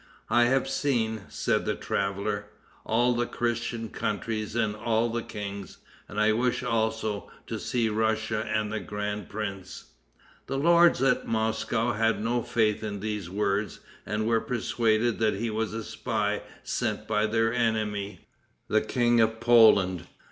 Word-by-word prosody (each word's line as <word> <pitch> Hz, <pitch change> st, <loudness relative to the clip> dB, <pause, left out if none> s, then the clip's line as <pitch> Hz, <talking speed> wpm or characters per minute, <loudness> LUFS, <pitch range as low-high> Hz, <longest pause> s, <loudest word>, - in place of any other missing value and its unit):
"I 120 Hz, +1 st, +5 dB
have 135 Hz, +2 st, +2 dB
seen," 115 Hz, -6 st, -1 dB
said -, -, 0 dB
the -, -, 0 dB
traveler, 100 Hz, +1 st, -2 dB, 0.4 s
"all 120 Hz, +2 st, +3 dB
the 120 Hz, 0 st, 0 dB
Christian 120 Hz, -1 st, -2 dB
countries 110 Hz, +1 st, -3 dB
and 110 Hz, -3 st, +1 dB
all 115 Hz, +2 st, +1 dB
the 115 Hz, +1 st, -2 dB
kings, 100 Hz, -3 st, -7 dB, 0.3 s
and 105 Hz, -, -4 dB
I 105 Hz, 0 st, +4 dB
wished, 120 Hz, +2 st, 0 dB
also, 110 Hz, -3 st, -1 dB, 0.2 s
to -, -, -4 dB
see 120 Hz, -2 st, 0 dB
Russia 110 Hz, 0 st, 0 dB
and 105 Hz, 0 st, 0 dB
the 110 Hz, -, -1 dB
grand 105 Hz, -1 st, -4 dB
prince." 95 Hz, -, -6 dB, 0.6 s
The 135 Hz, -, -2 dB
lords 170 Hz, -2 st, +5 dB
at 135 Hz, -1 st, +2 dB
Moscow 110 Hz, +1 st, 0 dB
had 115 Hz, +1 st, +1 dB
no 120 Hz, +3 st, 0 dB
faith 110 Hz, -2 st, +1 dB
in 100 Hz, -2 st, -4 dB
these 105 Hz, -3 st, -4 dB
words, 100 Hz, +1 st, -1 dB, 0.2 s
and 105 Hz, 0 st, -2 dB
were 115 Hz, 0 st, +2 dB
persuaded 115 Hz, -1 st, 0 dB
that 110 Hz, -2 st, +2 dB
he 115 Hz, +3 st, -2 dB
was 110 Hz, 0 st, -1 dB
a 110 Hz, +1 st, -4 dB
spy 105 Hz, -1 st, -2 dB, 0.2 s
sent -, -, -2 dB
by 105 Hz, 0 st, +1 dB
their 115 Hz, +1 st, +1 dB
enemy, 110 Hz, -4 st, -1 dB, 0.5 s
the 110 Hz, -, +3 dB
King 120 Hz, 0 st, +2 dB
of 110 Hz, 0 st, +1 dB
Poland. 110 Hz, -7 st, +5 dB
110 Hz, 150 wpm, -27 LUFS, 105-115 Hz, 0.6 s, I